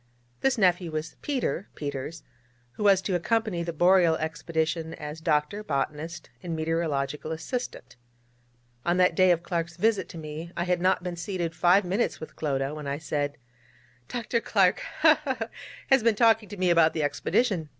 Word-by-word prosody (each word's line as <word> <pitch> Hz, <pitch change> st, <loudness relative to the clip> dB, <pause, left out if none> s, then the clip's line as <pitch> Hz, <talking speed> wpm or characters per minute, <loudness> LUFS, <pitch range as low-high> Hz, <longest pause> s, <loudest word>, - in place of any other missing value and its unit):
This 270 Hz, -2 st, +2 dB
nephew 180 Hz, -4 st, +3 dB
was 155 Hz, 0 st, -4 dB
Peter 250 Hz, -, -2 dB
Peters, 145 Hz, +2 st, -5 dB, 0.5 s
who 210 Hz, -, -6 dB
was 195 Hz, -2 st, +5 dB
to 195 Hz, -, -1 dB
accompany 210 Hz, 0 st, 0 dB
the 170 Hz, 0 st, -3 dB
Boreal 175 Hz, 0 st, +4 dB
expedition 160 Hz, 0 st, -2 dB
as 150 Hz, +2 st, -7 dB
doctor, 155 Hz, +6 st, 0 dB
botanist, 155 Hz, 0 st, -3 dB
and 170 Hz, -2 st, -4 dB
meteorological 155 Hz, -2 st, -1 dB
assistant. 160 Hz, -, -5 dB, 0.9 s
On 175 Hz, +1 st, +1 dB
that 180 Hz, -1 st, +4 dB
day 185 Hz, +2 st, +4 dB
of 170 Hz, -1 st, +3 dB
Clark's 170 Hz, -1 st, -3 dB
visit 220 Hz, +2 st, +1 dB
to -, -, -9 dB
me 160 Hz, +2 st, -7 dB
I 170 Hz, -, +1 dB
had 180 Hz, -1 st, 0 dB
not 185 Hz, 0 st, +2 dB
been 180 Hz, -1 st, -4 dB
seated 170 Hz, -1 st, -3 dB
five 175 Hz, +3 st, +4 dB
minutes 195 Hz, +7 st, 0 dB
with 155 Hz, -, -9 dB
Clodagh, 135 Hz, -2 st, -1 dB
when 150 Hz, -2 st, -6 dB
I 140 Hz, 0 st, -2 dB
said: 145 Hz, -2 st, -2 dB, 0.7 s
'Dr. 235 Hz, -1 st, -1 dB
Clark 190 Hz, -5 st, +3 dB, 0.2 s
ha! 310 Hz, -1 st, +6 dB
ha! 265 Hz, -3 st, -1 dB
ha! 225 Hz, 0 st, -3 dB, 0.4 s
has 270 Hz, -1 st, +6 dB
been 225 Hz, -1 st, +3 dB
talking 225 Hz, -2 st, +4 dB
to 205 Hz, -, -8 dB
me 180 Hz, -1 st, +2 dB
about 165 Hz, -2 st, +5 dB
the 155 Hz, -, -1 dB
Expedition. 170 Hz, +2 st, 0 dB
170 Hz, 170 wpm, -27 LUFS, 160-195 Hz, 0.9 s, ha